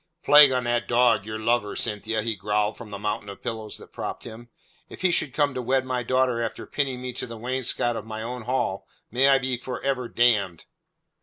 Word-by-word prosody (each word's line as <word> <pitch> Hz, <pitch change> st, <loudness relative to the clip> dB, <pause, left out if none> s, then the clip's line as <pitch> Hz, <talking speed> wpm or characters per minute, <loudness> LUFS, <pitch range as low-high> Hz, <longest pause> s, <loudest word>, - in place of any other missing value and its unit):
"Plague 145 Hz, -2 st, +8 dB
on 125 Hz, -1 st, 0 dB
that 120 Hz, 0 st, 0 dB
dog, 120 Hz, -4 st, +3 dB
your 110 Hz, 0 st, -4 dB
lover, 110 Hz, -1 st, 0 dB
Cynthia," 110 Hz, +1 st, -2 dB
he 115 Hz, -1 st, -1 dB
growled 105 Hz, +2 st, 0 dB
from 115 Hz, -3 st, -10 dB
the 100 Hz, -, -6 dB
mountain 105 Hz, 0 st, -3 dB
of 100 Hz, -, -10 dB
pillows 110 Hz, -2 st, -5 dB
that -, -, -14 dB
propped -, -, -5 dB
him. 120 Hz, +1 st, -10 dB, 0.4 s
"If -, -, -11 dB
he 185 Hz, -1 st, +3 dB
should 145 Hz, -, +1 dB
come 145 Hz, +1 st, +1 dB
to 130 Hz, -, -3 dB
wed 130 Hz, +2 st, +1 dB
my 130 Hz, -1 st, -1 dB
daughter 125 Hz, -1 st, +1 dB
after 115 Hz, -, -4 dB
pinning 130 Hz, -3 st, -2 dB
me 125 Hz, -1 st, -4 dB
to 125 Hz, -, -4 dB
the 115 Hz, -1 st, -8 dB
wainscot 120 Hz, 0 st, -1 dB
of 110 Hz, -, -4 dB
my 110 Hz, 0 st, -6 dB
own 120 Hz, 0 st, -6 dB
hall 125 Hz, -6 st, -1 dB, 0.2 s
may 130 Hz, +4 st, +4 dB
I 135 Hz, -, +6 dB
be 130 Hz, -1 st, -2 dB
for 125 Hz, +1 st, -6 dB
ever 130 Hz, -3 st, -1 dB
damned." 105 Hz, -8 st, +2 dB
120 Hz, 220 wpm, -25 LUFS, 110-130 Hz, 0.4 s, Plague